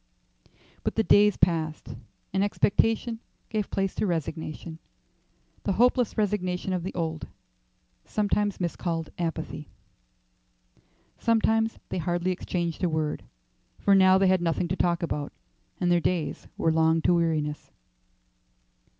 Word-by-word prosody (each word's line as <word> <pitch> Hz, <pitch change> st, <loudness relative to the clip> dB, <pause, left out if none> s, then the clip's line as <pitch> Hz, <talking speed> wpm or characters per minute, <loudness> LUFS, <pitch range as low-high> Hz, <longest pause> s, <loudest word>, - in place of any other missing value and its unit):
But -, -, -2 dB
the 220 Hz, -, +2 dB
days 210 Hz, -1 st, +5 dB
passed, 155 Hz, -7 st, 0 dB, 0.4 s
and 190 Hz, +1 st, +2 dB
expectation 225 Hz, +3 st, +1 dB, 0.3 s
gave 215 Hz, -3 st, -2 dB
place 195 Hz, -1 st, -1 dB
to 210 Hz, -, -1 dB
resignation 160 Hz, -1 st, -4 dB, 0.8 s
the 195 Hz, -, 0 dB
hopeless 245 Hz, +2 st, +2 dB
resignation 190 Hz, -3 st, -1 dB
of 180 Hz, -, -1 dB
the 185 Hz, -, -6 dB
old, 160 Hz, -2 st, -3 dB, 0.8 s
sometimes 205 Hz, -1 st, 0 dB
miscalled, 170 Hz, -2 st, -2 dB
apathy. 160 Hz, -3 st, -4 dB, 1.5 s
Sometimes 225 Hz, -1 st, +2 dB
they 185 Hz, -, -2 dB
hardly 175 Hz, +2 st, 0 dB
exchanged 175 Hz, -1 st, -3 dB
a 180 Hz, -, +3 dB
word, 155 Hz, -1 st, -2 dB, 0.5 s
for 200 Hz, -, +3 dB
now 190 Hz, -1 st, +6 dB
they 195 Hz, -, +3 dB
had 185 Hz, -1 st, +3 dB
nothing 170 Hz, 0 st, 0 dB
to 185 Hz, -, 0 dB
talk 175 Hz, -2 st, +1 dB
about, 150 Hz, -3 st, -3 dB, 0.5 s
and 175 Hz, -1 st, +1 dB
their 175 Hz, -1 st, +4 dB
days 165 Hz, -3 st, -2 dB
were 165 Hz, -, +2 dB
long 160 Hz, 0 st, +3 dB
to -, -, +4 dB
weariness. 155 Hz, -3 st, 0 dB
175 Hz, 125 wpm, -27 LUFS, 160-200 Hz, 1.5 s, now